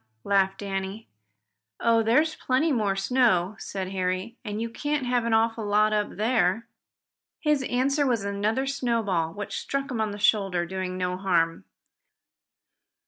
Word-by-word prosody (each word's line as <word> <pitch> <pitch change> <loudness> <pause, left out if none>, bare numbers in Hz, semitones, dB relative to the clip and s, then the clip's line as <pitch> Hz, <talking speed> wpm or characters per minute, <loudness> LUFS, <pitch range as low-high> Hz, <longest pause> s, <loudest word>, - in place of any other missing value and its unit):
laughed 195 -1 +2
Danny. 195 +2 -4 0.7
"Oh, 230 -1 +3
there's 300 +9 +3
plenty 265 +5 +1
more 210 -7 +1
snow," 200 -3 +2
said 190 -2 -5
Harry, 185 +4 -2
"and 210 -2 -4
you 230 - -2
can't 290 +4 -2
have 245 -1 +1
an 235 - +1
awful 225 0 +1
lot 210 +1 +3
up 210 -1 -1
there." 225 -1 +1 0.7
His 300 -3 +2
answer 270 +3 +1
was 235 -5 +1
another 210 +6 0
snowball, 230 -11 0
which 205 +3 -5
struck 275 0 -3
him 230 -3 -1
on 215 - 0
the 205 - -6
shoulder, 195 -4 +2
doing 185 0 -4
no 180 0 -1
harm. 165 - 0
215 Hz, 145 wpm, -26 LUFS, 190-245 Hz, 0.7 s, Oh